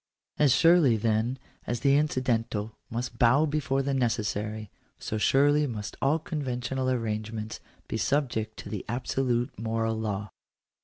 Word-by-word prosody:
As 145 -3 +5
surely 160 -4 +5
then 110 +3 0 0.3
as 120 0 -2
the 140 -1 +4
incidental 115 -7 0
must 120 +1 -4
bow 130 +6 +5
before 140 -3 0
the 140 0 -1
necessary, 110 -4 -1 0.3
so 110 - -4
surely 145 +5 +4
must 105 -4 -5
all 140 +4 +3
conventional 130 -5 -2
arrangements 110 -2 -3 0.3
be - - -2
subject 115 -5 -1
to - - -8
the 100 -2 -4
absolute 125 0 -1
moral 115 0 -1
law. 105 -2 -3
120 Hz, 135 wpm, -28 LUFS, 110-135 Hz, 0.3 s, As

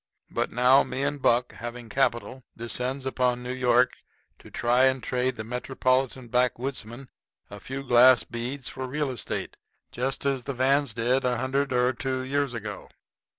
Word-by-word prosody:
But - - -1
now, 125 +3 +5
me 130 +2 -3
and 145 0 -2
Buck, 120 0 +2
having 120 0 -7
capital, 130 +1 -1
descends 125 +4 -3
upon 125 -2 0
New 125 +1 -4
York 125 -1 +3 0.5
to - - -14
try 120 +2 +2
and 130 -2 +1
trade 125 +1 0
the 110 - -5
metropolitan 130 +1 -1
backwoodsmen 125 0 -2 0.4
a 105 - -8
few 135 +6 -6
glass 125 -4 +6
beads 120 +7 -5
for 130 0 -5
real 145 +1 -2
estate 125 - -5 0.3
just 130 +3 -3
as 135 -3 0
the 140 - -4
Vans 135 -1 +2
did 125 +3 +1
a 125 -1 +1
hundred 135 +3 -1
or 125 0 +2
two 130 0 -3
years 140 -1 -1
ago. 105 -3 -6
125 Hz, 160 wpm, -26 LUFS, 120-135 Hz, 0.5 s, glass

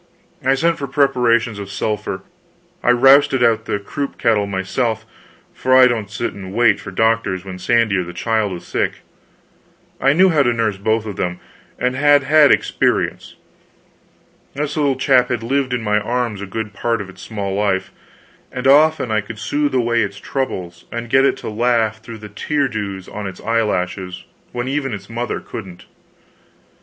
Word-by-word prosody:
I 135 +1 +3
sent 165 +4 +1
for 140 - -3
preparations 120 -5 +2
of 100 -1 -7
sulphur, 105 -1 -3 0.6
I - - +1
rousted 135 +1 +5
out 115 -1 +2
the - - -1
croup 140 +8 -5
kettle 105 -3 +2
myself; 110 +4 -2 0.5
for 130 0 +2
I 130 - +8
don't 115 -5 0
sit 105 +4 -3
down 100 - -9
and 95 - -8
wait 120 -1 +4
for - - -8
doctors 105 -2 0
when 95 -1 -7
Sandy 115 0 +2
or 90 - 0
the 85 - -8
child 110 +2 -1
is 85 - -8
sick. - - -2 1.0
I 135 +2 +4
knew 185 +4 +5
how 155 -4 +3
to 120 -3 +2
nurse 110 -3 -1
both 110 +2 0
of 105 -3 -6
them, 90 -1 -2 0.4
and 125 +1 -1
had 145 +1 +4
had 150 0 +5
experience. - - 0 1.2
This 145 +1 -2
little 145 -3 +1
chap 130 -2 +3
had 115 - -2
lived 135 +2 0
in 125 -2 -1
my 105 0 +2
arms 120 -2 -2
a 100 - -5
good 105 +1 -5
part 115 +2 -1
of 100 - -6
its 90 0 -13
small 100 -3 -4
life, 100 -2 0 0.6
and 125 +1 -5
often 150 -2 +4
I 110 0 +2
could 110 +2 -9
soothe 145 +7 -1
away 120 -2 +2
its 100 0 -3
troubles 90 -9 -4
and 115 0 -5
get 135 +1 +5
it - - +2
to - - -8
laugh 110 -1 +1
through 115 0 -9
the 105 -1 -10
tear 140 +7 -1
dews 100 -6 -5
on 105 -2 -6
its 95 - -8
eye 115 0 +1
lashes 90 -3 -3 0.3
when 120 +1 -3
even 135 -3 -2
its 105 - -11
mother 120 +1 -3
couldn't. 90 -5 -9
115 Hz, 185 wpm, -19 LUFS, 100-130 Hz, 1.2 s, I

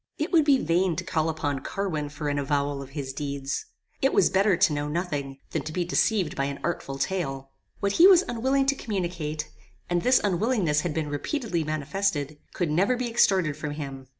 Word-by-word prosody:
"It 310 +4 -2
would 325 -4 +5
be 285 -2 +5
vain 175 -3 +1
to - - -3
call 160 -2 0
upon 145 -3 -2
Carwin 155 -2 -3
for 150 +1 -5
an 145 0 0
avowal 140 0 -1
of 135 - -9
his 135 -2 -4
deeds. 140 -1 -4 0.3
It 270 - +3
was - - +4
better 195 -1 +3
to 180 -4 +4
know 145 0 -2
nothing, 150 -4 -3
than - - -1
to 155 - -6
be 175 +2 -1
deceived 185 -1 +1
by 140 - 0
an 140 0 -4
artful 140 -5 -3
tale. 135 -6 -3 0.3
What 200 -1 +1
he 335 - +7
was 375 -2 +7
unwilling 265 +3 +1
to 275 +1 +2
communicate, 170 - -3 0.4
and 175 0 +2
this 255 +4 +4
unwillingness 195 -5 +1
had 170 -3 -3
been 160 -2 -1
repeatedly 175 - -2
manifested, 155 0 -2 0.2
could 170 -4 0
never 195 +11 +2
be 245 -1 -2
extorted 185 -9 +3
from 145 0 -5
him. 135 -3 -7
165 Hz, 200 wpm, -26 LUFS, 145-200 Hz, 0.4 s, he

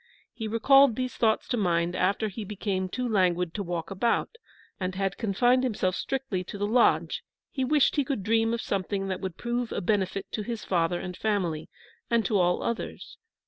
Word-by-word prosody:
He 220 - -5
recalled 270 +3 +5
these 255 +1 -2
thoughts 220 -2 +1
to 245 - 0
mind 175 -3 +1
after 200 +4 +1
he 210 +2 -6
became 195 -2 -2
too 250 +6 -2
languid 180 -5 +1
to 205 - -3
walk 175 -1 -4
about, 230 - 0 0.4
and 185 -1 -2
had 195 0 -1
confined 245 +4 +2
himself 200 -7 0
strictly 265 -9 -2
to 205 - -7
the 205 - -1
lodge; 235 +3 +3 0.3
he 265 - -1
wished 290 +2 +3
he 285 - +4
could 265 -7 -3
dream 225 +2 +2
of 235 - -1
something 195 0 -2
that 185 - -3
would 190 -3 -5
prove 240 0 -2
a - - -1
benefit 195 0 0
to 215 - -2
his 225 +1 -5
father 175 -1 +1
and 180 -1 -6
family, 185 -8 -1 0.4
and 230 -2 +2
to 200 +2 +2
all 180 0 +2
others. 235 - -5
205 Hz, 190 wpm, -27 LUFS, 185-235 Hz, 0.4 s, recalled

